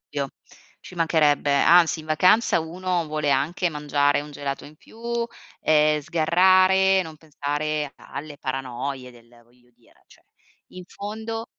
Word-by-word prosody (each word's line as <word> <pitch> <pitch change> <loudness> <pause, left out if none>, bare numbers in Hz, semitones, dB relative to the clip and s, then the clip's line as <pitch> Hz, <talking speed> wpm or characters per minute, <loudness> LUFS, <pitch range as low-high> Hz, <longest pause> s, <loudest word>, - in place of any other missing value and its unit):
dubbio. 140 -2 -5 0.5
Ci - - -13
mancherebbe, 155 -4 +2
anzi 165 +2 +4
in 155 - -14
vacanza 180 +4 +3
uno 175 +1 -3
vuole 150 -1 -1
anche 165 +6 0
mangiare 145 -1 +1
un 150 0 -9
gelato 140 -1 -5
in 150 - -15
più, 225 - -18 0.6
ehm, 150 0 +3
sgarrare, 185 +5 +4
non 160 -2 -10
pensare 150 -1 -3
alle 145 +1 -9
paranoie 130 0 -5
del 120 -1 -19
voglio 120 +1 -29
dire, 120 -1 -28
cioè - - -22 0.5
in 185 - -10
fondo 220 +4 -6
155 Hz, 135 wpm, -23 LUFS, 145-175 Hz, 0.6 s, anzi